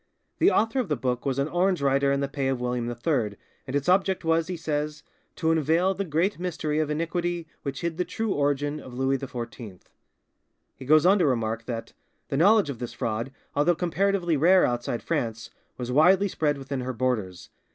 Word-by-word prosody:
The 350 - +6
author 225 - +1
of 240 -8 -2
the 150 - +2
book 125 +1 -2
was 135 -1 0
an 140 +1 +1
Orange 180 +2 +1
writer 140 0 +2
in 140 0 +1
the 140 - 0
pay 135 -1 -2
of 135 -2 0
William 125 -1 -2
III, 120 -3 -1 0.3
and 130 - -4
its 140 -1 -1
object 190 -1 +2
was, 165 0 +2
he 180 -1 -4
says, 150 -1 -3 0.3
"to 160 -2 +1
unveil 165 +4 +2
the 195 +1 -2
great 170 +3 0
mystery 155 -4 -2
of 155 -1 0
iniquity 170 +2 -2 0.2
which 140 - -5
hid 170 -2 -2
the 180 - +1
true 225 +1 -3
origin 145 +1 0
of 125 -4 -10
Louis 135 +1 +1
XIV." 120 -7 -7 1.0
He 130 - -11
goes 155 +3 +5
on 195 +3 +5
to 170 - +3
remark 115 -3 -1
that 115 -1 -5 0.4
"the 135 - -1
knowledge 200 -1 +4
of 125 - -9
this 120 - -5
fraud, 115 +4 -3 0.2
although 150 +5 +3
comparatively 180 0 +1
rare 180 +6 +5
outside 120 -1 -2
France, 115 -8 -3 0.3
was 125 -1 -4
widely 180 +8 +5
spread 150 -5 0
within 135 -1 -4
her 130 +1 -3
borders. 115 -7 -2
145 Hz, 195 wpm, -26 LUFS, 130-175 Hz, 1.0 s, The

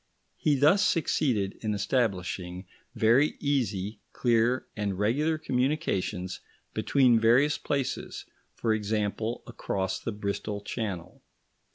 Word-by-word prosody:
He 150 - +3
thus 155 +9 +5
succeeded 125 - +1
in 105 -2 -1
establishing 95 -4 -1 0.3
very 120 +6 +4
easy, 110 -8 -1
clear, 120 +1 +2
and 100 -3 -2
regular 145 +10 +1
communications 125 - -1 0.3
between 125 -5 +4
various 125 +7 +4
places; 140 -3 -3 0.3
for 115 -2 +1
example, 110 +2 -2
across 95 -1 -3
the 115 - -4
Bristol 105 0 -3
Channel. 100 -5 -5
110 Hz, 100 wpm, -28 LUFS, 100-135 Hz, 0.3 s, thus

